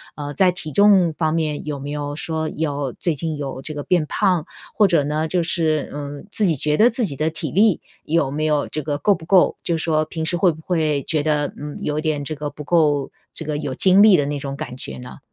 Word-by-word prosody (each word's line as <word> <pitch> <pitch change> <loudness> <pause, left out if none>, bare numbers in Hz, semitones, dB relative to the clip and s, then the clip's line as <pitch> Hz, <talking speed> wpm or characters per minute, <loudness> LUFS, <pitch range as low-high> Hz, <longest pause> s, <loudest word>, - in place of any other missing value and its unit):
呃， 145 -1 -5
在 185 +3 +3
体 155 -3 -7
重 195 -2 +5
方 160 -2 0
面 155 -3 -1
有 150 -2 -3
没 140 +1 -6
有 145 0 -4
说 160 0 -3
要 145 -4 -2
最 170 - -1
近 155 +1 -4
有 135 -2 -5
这 155 +2 -6
个 145 - -4
变 170 -2 +1
胖， 180 -5 +1 0.3
或 210 -2 +4
者 165 -5 +2
呢 155 +2 -1
就 175 +1 0
是 160 -3 0
嗯， 145 +1 -7
自 215 - -1
己 165 - +2
觉 150 +2 0
得 225 +8 +5
自 240 -1 0
己 140 -8 -4
的 155 +3 0
体 160 -3 -4
力， 205 +1 +3 0.2
有 150 -4 +1
没 155 +2 -2
有 150 -2 +1
这 155 - -4
个 145 0 -2
够 205 +7 +3
不 165 -4 -8
够 185 -1 +4
就 170 - 0
是 160 - -3
说 155 -2 +1
平 160 +1 -4
时 165 - +1
会 180 0 +4
不 160 - -11
会 155 -5 0
觉 155 -3 0
得， 150 -1 0
嗯， 150 +1 -7
有 150 +1 -1
点 155 -2 -1
这 155 - -3
个 150 -1 -4
不 150 - -10
够 150 -3 +2 0.2
这 160 - -5
个 150 -1 -2
有 135 -3 -4
精 190 +6 +6
力 210 -3 +7
的 145 - +1
那 145 0 -3
种 135 0 -5
感 125 - -6
觉 130 - -7
呢？ 125 +2 -10
155 Hz, 270 characters per minute, -21 LUFS, 145-170 Hz, 0.3 s, 力